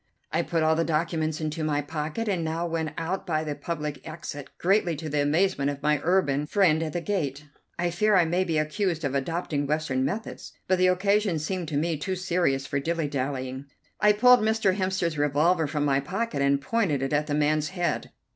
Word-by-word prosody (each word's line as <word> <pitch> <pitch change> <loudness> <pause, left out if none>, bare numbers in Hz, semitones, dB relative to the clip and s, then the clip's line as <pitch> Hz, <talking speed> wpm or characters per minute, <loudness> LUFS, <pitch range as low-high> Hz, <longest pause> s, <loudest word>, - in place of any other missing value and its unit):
I 165 - +1
put 165 -1 -1
all 160 0 +3
the 165 - +1
documents 160 -1 -1
into 155 0 -3
my 150 -1 +1
pocket, 155 +8 -3
and 185 -5 0
now 160 +2 -2
went 165 -2 -2
out 180 +5 -3
by 155 -2 0
the 150 -1 -3
public 150 -2 -4
exit, 150 -3 -7
greatly 180 -2 +2
to 155 +1 -6
the 145 0 +1
amazement 150 0 +2
of 140 0 -5
my 150 -1 +2
urbane 150 -5 +2
friend 165 -4 +3
at 155 -2 -3
the 175 - -2
gate. 150 -8 -2 0.3
I 175 0 0
fear 210 +4 +2
I 180 -2 +5
may 175 +3 +1
be 165 -4 -1
accused 165 +2 -1
of 140 -2 -1
adopting 145 0 -1
Western 150 -3 0
methods, 200 +11 -4
but 185 0 +2
the 185 - +5
occasion 200 0 +2
seemed 175 +3 -3
to 150 -2 -2
me 160 +1 0
too 185 +6 -3
serious 175 -7 0
for 140 - -1
dilly 165 +1 -1
dallying. 130 -1 -3 0.3
I 210 0 +5
pulled 250 +4 +6
Mr. 220 -3 +2
Hemster's 185 -5 -1
revolver 150 +3 +2
from 145 0 -1
my 135 -1 +3
pocket 185 +3 -2
and 140 0 +3
pointed 150 - 0
it 135 - -2
at 150 +1 +1
the 145 - -1
man's 150 0 +1
head. 175 -2 -2
160 Hz, 205 wpm, -26 LUFS, 145-180 Hz, 0.3 s, pulled